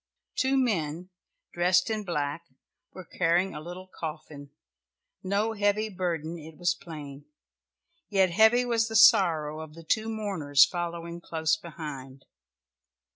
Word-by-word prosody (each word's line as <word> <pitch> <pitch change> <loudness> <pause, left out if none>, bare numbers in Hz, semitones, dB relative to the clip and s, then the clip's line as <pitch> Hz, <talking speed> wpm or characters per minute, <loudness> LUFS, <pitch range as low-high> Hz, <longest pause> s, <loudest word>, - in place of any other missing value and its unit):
Two 270 0 +1
men, 180 - -1 0.4
dressed 180 +3 +2
in 215 -1 -2
black, 165 -2 -3 0.4
were 185 - -10
carrying 180 +3 +1
a 150 - -7
little 175 +3 -8
coffin 155 -4 -8 0.7
no 200 +4 0
heavy 210 +1 +1
burden, 170 -4 -3
it 155 0 -12
was 175 -1 +1
plain 145 -5 -10 0.8
yet 190 -3 +3
heavy 220 +6 +5
was 230 -2 +1
the 225 - -6
sorrow 170 -9 +5
of 160 -1 -9
the 165 - -11
two 220 +7 0
mourners 185 -11 +3
following 170 -1 -5
close 160 -1 0
behind. 150 -5 -9
175 Hz, 130 wpm, -27 LUFS, 155-205 Hz, 0.8 s, heavy